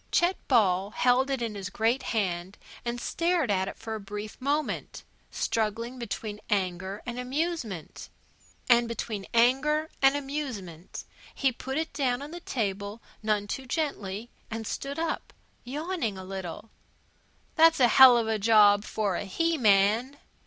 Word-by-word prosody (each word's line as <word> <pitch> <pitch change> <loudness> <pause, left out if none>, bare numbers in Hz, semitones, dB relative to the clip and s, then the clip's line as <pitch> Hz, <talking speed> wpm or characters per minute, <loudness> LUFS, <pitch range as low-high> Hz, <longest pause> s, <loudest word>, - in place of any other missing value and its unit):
Chet 350 +2 +3
Ball 195 -6 +3
held 250 +4 +2
it 265 -3 -1
in 225 -2 -3
his 200 -2 -5
great 230 +6 +1
hand 185 -3 -2 0.3
and 240 0 -3
stared 335 -4 0
at 190 -1 +1
it - - -6
for 220 - -6
a 220 - -3
brief 205 +1 -7
moment, 290 +3 -2 0.3
struggling 230 +3 -2
between 210 -2 -5
anger 190 0 -1
and 245 0 -5
amusement. 255 - -3 0.6
And 235 -1 +5
between 215 -3 -4
anger 270 +7 +3
and 270 +1 +5
amusement 255 - -5 0.3
he 270 -2 +2
put 265 +3 -5
it 320 0 -2
down 260 -2 0
on 295 - -8
the 345 - -7
table 205 - -3 0.2
none 215 -1 0
too 260 +6 -5
gently 240 - -3 0.2
and 225 0 -5
stoop 275 +6 -4
up, 330 0 -3 0.3
yawning 280 - -3
a 190 - -7
little. 190 +2 -7 0.8
"That's 325 -1 +5
a 250 - +6
hell 255 0 +9
of 230 -1 0
a 220 -1 0
job 205 -1 +6
for 210 -4 -1
a - - -4
he 330 - 0
man!" 220 +3 +3
230 Hz, 150 wpm, -28 LUFS, 205-270 Hz, 0.8 s, hell